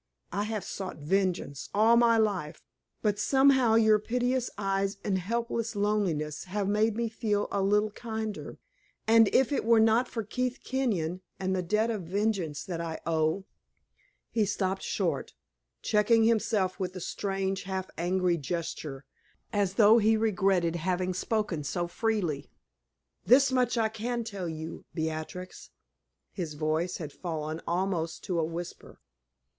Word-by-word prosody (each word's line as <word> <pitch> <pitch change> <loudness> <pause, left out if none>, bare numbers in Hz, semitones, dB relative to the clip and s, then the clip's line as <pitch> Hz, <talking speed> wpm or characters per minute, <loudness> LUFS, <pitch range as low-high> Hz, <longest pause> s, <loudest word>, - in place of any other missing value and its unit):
I 205 +3 -1
have 215 -3 -3
sought 190 -1 -6
vengeance 170 -3 -1
all 220 +3 +5
my 235 -1 +5
life, 185 -8 -1 0.4
but 205 -2 +1
somehow 265 -2 +4
your 220 -1 +5
piteous 245 +3 0
eyes 195 0 -1
and 190 -2 0
helpless 230 +3 -2
loneliness 195 -8 0
have 195 +1 -2
made 210 +2 +2
me 235 0 0
feel 215 -2 -1
a 200 - 0
little 210 +2 +2
kinder, 220 -1 -5 0.5
and 225 -1 +6
if 265 +2 +3
it 285 - 0
were 230 0 +5
not 225 +3 +4
for 225 - -4
Keith 250 +4 -2
Kenyon, 185 -10 -1 0.2
and 190 0 0
the 185 - 0
debt 215 +6 +1
of 215 -3 -3
vengeance 190 -5 -1
that 170 -3 -4
I 165 -1 -4
owe 160 +3 0 0.4
" - - -40
He 225 - +2
stopped 195 -1 -1
short, - - -2 0.5
checking 220 +1 +4
himself 220 -4 +1
with 185 -1 -3
a - - -4
strange, 195 +1 -2
half 190 -1 -3
angry 180 0 +1
gesture, 150 -3 -4 0.5
as 200 -2 +1
though 220 +2 +7
he 220 +1 +4
regretted 190 -5 +2
having 185 +2 -1
spoken 190 -4 -1
so 175 +4 -2
freely. 175 -7 -1 0.8
"This 275 +2 +6
much 250 -2 +2
I 225 -1 +3
can 235 +2 -3
tell 200 -6 -5
you, 160 0 -6
Beatrix" 160 +3 -5 0.6
his 165 -6 -5
voice 160 +4 -1
had 150 -4 -7
fallen 160 -2 -4
almost 175 -2 -1
to 180 -3 -1
a - - +2
whisper. 165 +2 -6
195 Hz, 150 wpm, -29 LUFS, 175-220 Hz, 0.8 s, though